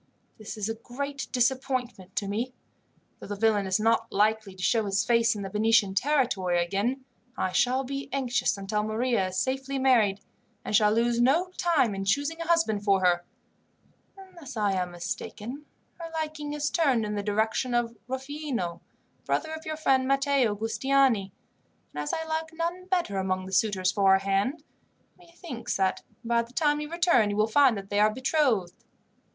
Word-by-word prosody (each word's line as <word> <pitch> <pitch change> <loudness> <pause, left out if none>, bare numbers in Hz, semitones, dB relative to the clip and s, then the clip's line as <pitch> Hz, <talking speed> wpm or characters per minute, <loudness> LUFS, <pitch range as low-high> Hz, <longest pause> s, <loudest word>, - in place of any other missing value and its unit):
"This 215 +1 -7
is 210 -1 -2
a 225 - -1
great 275 +5 -6
disappointment 250 -6 -1
to 200 - -1
me. 235 +5 -3 0.6
Though - - -9
the 205 - -4
villain 205 -1 +2
is 190 +2 +1
not 225 +1 +1
likely 215 -1 +1
to 185 - -8
show 225 +1 +2
his 200 +1 0
face 230 -1 +3
in 205 - -5
the 195 - -5
Venetian 210 -2 +3
territory 205 -8 +1
again, 235 +9 -2 0.3
I 185 - -1
shall 255 +5 +2
be 275 +1 -5
anxious 265 -4 0
until 200 +2 -2
Maria 215 -1 0
is 185 0 -5
safely 270 +1 -1
married, 235 -7 +3 0.5
and - - -1
shall 210 -1 +5
lose 235 +2 +2
no 325 +9 +3
time 310 -11 +2
in 195 0 -4
choosing 285 +10 0
a 335 - -4
husband 330 -12 +2
for 195 -2 +3
her. 175 -1 +3 0.9
Unless 340 -9 -11
I 205 -2 +2
am 185 -2 -1
mistaken, 215 +10 -6 0.3
her 335 -1 -6
liking 305 -1 -4
is 295 0 -1
turned 270 -10 +2
in 210 - -3
the 205 - -2
direction 220 +4 0
of 235 -1 0
Rufino, 265 - -4 0.4
brother 315 0 -1
of 315 0 -8
your 310 0 -3
friend 265 -4 +2
Matteo 275 -5 +2
Giustiniani, 225 -1 +1 0.6
and 150 - -3
as 150 - -3
I 320 - -2
like 320 0 -3
none 345 +3 -3
better 345 - 0
among 185 0 -1
the 190 - -8
suitors 190 -3 +2
for 195 -1 +4
her - - +6
hand, 200 +10 -1 0.5
methinks 340 -7 -6
that 190 -1 0 0.2
by 235 0 +2
the 235 +1 -11
time 295 0 +1
you 300 - -5
return 340 - +3
you 205 - -2
will 215 +1 +3
find 250 0 +4
that 195 0 -9
they 205 - +1
are 215 +1 +5
betrothed. 255 - 0
235 Hz, 180 wpm, -27 LUFS, 205-275 Hz, 0.9 s, her